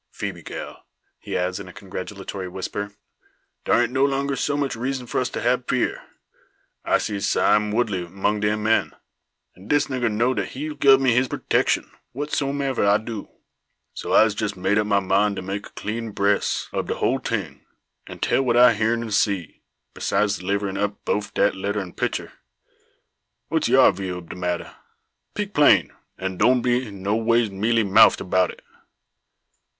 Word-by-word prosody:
"Phoebe, 95 -4 -6
gal," - - -8 0.3
he - - -4
adds, 90 +1 -1
in 100 - -8
a 90 - -11
congratulatory 95 0 -7
whisper, 100 +2 -5 0.7
"dar 120 - +4
ain't 120 - -2
no 130 +1 +1
longer 140 0 0
so 145 +1 -1
much 140 -3 -1
reezun 125 +2 -3
for 120 - -1
us 125 - -1
to - - -5
hab 125 +1 +1
fear. 125 - 0 0.8
I - - +3
see 105 -1 -3
Sime 105 +1 +2
Woodley 105 -6 -1
mong 100 +4 -1
de 105 0 +1
men; 110 +1 +1 0.6
and 95 +3 -15
dis 145 -1 +2
nigger 125 -4 0
know 120 +5 +1
dat 100 -5 -2
he'll 150 +4 -4
gub 135 -2 +5
me 130 -3 +3
his 125 +2 +2
purtecshun, - - 0 0.3
whatsomever 140 -1 -1
I 100 +1 +5
do. 110 -1 -7 0.6
So - - -6
I'se 110 -1 +5
jess 105 -1 -3
made 100 +3 +1
up 105 - 0
my 100 -1 +3
mind 100 +2 +2
to 95 - -5
make 100 +2 -5
a - - -23
clean 115 +2 -4
bress 100 +1 0
ob - - -2
de - - -2
hul - - 0
ting, - - -4 0.4
and - - -7
tell - - +2
what 120 -3 +1
I 125 0 +7
heern 115 +1 0
an' 115 - -6
see, 100 -4 0 0.3
besides 100 -1 0
deliverin' 100 +1 -2
up 105 0 -3
boaf 105 0 -1
dat 100 - +2
letter 100 +2 -2
an' 95 -3 -6
picter. - - -3 1.2
What's - - 0
yar - - +6
view 95 -1 -5
ob 85 -2 -10
de - - -7
matter? 90 -1 -3 0.6
Peak 205 -1 -3
plain, 145 -1 +4 0.2
and 95 -1 -4
doan 125 +3 +4
be 125 -1 +1
noways 110 +3 0
mealy 110 +4 +1
moufed 95 -1 +5
'bout 90 0 +2
it." - - -11
105 Hz, 175 wpm, -23 LUFS, 100-125 Hz, 1.2 s, I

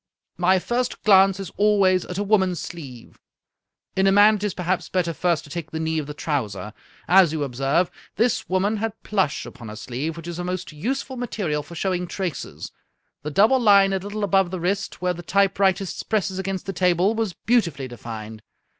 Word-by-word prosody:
My 185 +2 +4
first 240 +6 -2
glance 195 -2 +5
is 195 -3 -6
al 210 0 +4
ways 185 -2 +3
at 180 - -6
a 205 - 0
woman's 190 -4 +2
sleeve. 135 -9 -9 0.8
In 190 0 +3
a - - +5
man 205 +2 +7
it 205 - -8
is 205 -3 -1
perhaps 180 0 -2
better 175 -3 0
first 170 -1 0
to 150 - -14
take 170 -1 -5
the 160 - -5
knee 160 0 -1
of 145 - -5
the 150 - -7
trouser. 110 - -3 0.3
As 180 -2 +6
you 155 -2 -1
observe, 135 +6 0 0.2
this 230 +1 0
woman 195 +4 +1
had 225 +1 -4
plush 190 -8 0
upon 120 -5 -10
her 105 - -7
sleeve, 130 +8 -4
which 165 0 -8
is 175 0 -5
a - - -2
most 180 -1 -4
useful 260 - -3
material 200 -11 -2
for 160 +4 -12
showing 180 0 -1
traces. 180 -3 -5 0.5
The 150 - -4
double 215 - +4
line 200 -4 +5
a 190 - 0
little 205 +2 -5
above 195 -2 +3
the 185 0 -4
wrist, 195 +1 -2
where 180 0 +1
the 175 - -8
typewritist 195 0 +1
presses 195 -3 0
against 190 -1 -3
the 195 - -4
table, 180 +3 +2
was 220 -4 -2
beautifully 170 - 0
defined. 110 -2 -8
185 Hz, 200 wpm, -23 LUFS, 160-200 Hz, 0.8 s, man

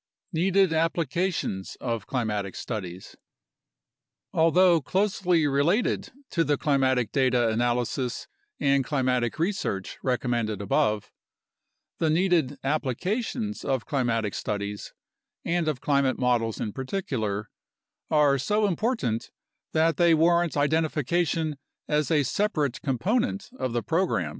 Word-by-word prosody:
Needed 185 +1 +3
Applications 165 - -1
of 115 -5 -3
Climatic 105 -6 -2
Studies 95 -5 -6 1.2
Although 170 +1 +4
closely 185 -1 +1
related 145 - +1 0.2
to 165 - +2
the 145 -2 +1
climatic 130 -5 +1
data 125 -3 +2
analysis 120 +2 -1 0.3
and 140 -1 +3
climatic 125 -4 0
research 160 - -2
recommended 120 -5 -1
above, 105 +1 0 0.9
the 160 - +2
needed 160 -4 +2
applications 190 - -2
of 130 -4 -1
climatic 115 -7 0
studies 105 0 -4 0.5
(and 170 -1 0
of 150 -5 -1
climate 140 -2 +2
models 120 -3 +1
in 105 - -3
particular) 125 - -3 0.6
are 145 -3 +4
so 210 - +1
important 195 - -1 0.4
that 160 +1 +2
they 170 -2 +5
warrant 170 0 +3
identification 155 +1 0 0.3
as 150 -1 +1
a 155 -3 +3
separate 150 - -1
component 200 - -1
of 130 - -1
the 120 -1 -1
program. 160 - 0
140 Hz, 110 wpm, -26 LUFS, 120-170 Hz, 1.2 s, they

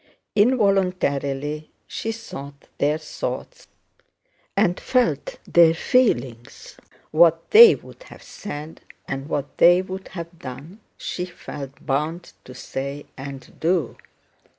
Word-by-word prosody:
Involuntarily 180 - +1 0.2
she 225 - -4
thought 140 -11 -9
their 150 +2 +2
thoughts 155 -1 -6 0.9
and 175 - +2
felt 255 - 0
their 165 -1 +5
feelings. 135 - 0 0.4
What 165 +1 +4
they 465 +2 +10
would - - -15
have - - -14
said 155 -5 -8 0.3
and 135 +2 -5
what 145 -2 -4
they 175 +2 +6
would 190 0 -7
have 170 -1 -8
done 145 - -9 0.2
she 180 - -4
felt 145 -6 -9
bound 155 +6 -2
to 125 - -11
say 140 +3 -5
and 135 -1 -9
do. 170 0 0
160 Hz, 110 wpm, -23 LUFS, 140-185 Hz, 0.9 s, they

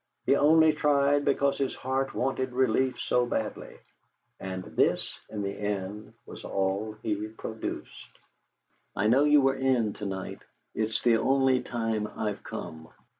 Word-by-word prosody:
He 140 - +4
only 160 +2 +5
tried 145 -1 +2
because 140 0 +1
his 135 -1 -1
heart 135 +1 -2
wanted 130 0 -1
relief 130 0 +1
so 125 - +1
badly. 110 -3 -4 0.6
And 95 -1 -5
this, - - 0
in 105 -2 -4
the 100 - -2
end, 105 0 -4
was - - -10
all 100 +3 -1
that 110 - -22
he 105 -1 -2
produced: 110 0 -7 0.8
"I 105 - 0
know 130 +7 +4
you 150 -1 +6
were 135 0 +3
in 125 -5 +1
to 105 - -6
night. 95 -1 -5 0.3
It's 110 0 -1
the 120 -2 +5
only 130 +1 +3
time 115 -3 -2
I've 105 -1 -4
come. 80 0 -7
115 Hz, 150 wpm, -28 LUFS, 105-135 Hz, 0.8 s, you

